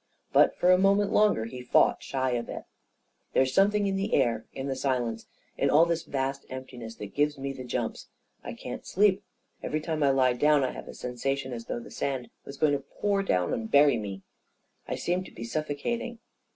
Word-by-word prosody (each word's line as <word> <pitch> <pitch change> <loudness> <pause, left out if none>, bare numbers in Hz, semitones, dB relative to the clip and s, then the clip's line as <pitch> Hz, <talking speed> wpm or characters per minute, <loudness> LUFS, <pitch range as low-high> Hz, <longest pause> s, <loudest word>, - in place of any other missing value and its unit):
But - - +5
for 180 - +4
a 185 - +6
moment 200 +1 +3
longer 210 - +3
he 125 +2 -7
fought 125 - +3
shy 130 -1 -1
of 120 -1 -2
it - - -6 0.4
" - - -46
There's 130 0 +2
something 205 +3 +3
in 195 -1 0
the 200 +2 0
air 115 -2 +1
— - - -45
in 135 - -5
the 135 - -1
silence 125 -4 -1
— - - -39
in - - +3
all 160 +3 +6
this 170 -1 0
vast 135 -1 -3
emptiness 125 -3 -8
that 105 -2 -8
gives 145 0 +1
me 135 0 -4
the 130 - -8
jumps. 125 - -3 0.4
I - - -6
can't - - -7
sleep. 200 0 +3 0.4
Every 155 - -2
time 155 0 -3
I 140 - +4
lie 130 -2 +3
down, 150 +3 +3
I 130 - 0
have - - -9
a - - -8
sensa 125 +2 -2
tion 130 -2 -5
as 115 -1 -6
though - - -3
the 120 - -11
sand 130 -3 -3
was 140 - -9
going 150 0 +3
to 140 - +1 0.2
pour 200 -1 +2
down 90 - +1
on - - 0
me - - -4
and 110 - -8
bury 145 -3 +6
me. 100 -3 -6 0.6
I - - -2
seem 180 +2 -1
to - - -12
be 115 - -8
suffocating." 155 - -3
135 Hz, 230 wpm, -28 LUFS, 125-170 Hz, 0.6 s, a